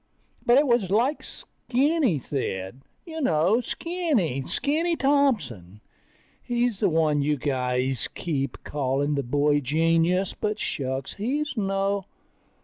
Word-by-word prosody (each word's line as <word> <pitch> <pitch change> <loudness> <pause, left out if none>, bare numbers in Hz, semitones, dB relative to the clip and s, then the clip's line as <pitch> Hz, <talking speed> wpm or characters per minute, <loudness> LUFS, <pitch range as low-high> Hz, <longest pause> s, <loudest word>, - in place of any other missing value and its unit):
But 240 +2 +5
it 290 - +5
was 235 -7 +2
like 240 +9 +1
Skinny 270 - -1
said... 125 -5 -4 0.2
You 320 -2 -6
know, 185 - +3
Skinny. 275 - -1
Skinny 330 +4 0
Thompson. 230 - 0 0.6
He's 240 -3 -1
the 200 - +3
one 155 -3 +2
you 150 +1 +1
guys 130 -2 -1
keep 140 -5 -2
calling 140 +1 -1
the 140 - 0
boy 145 +3 +2
genius, 165 +6 +1
but 210 0 -2
shucks, 135 -7 -3
he's 280 +9 -2
no 195 -2 0
180 Hz, 120 wpm, -25 LUFS, -, 0.6 s, But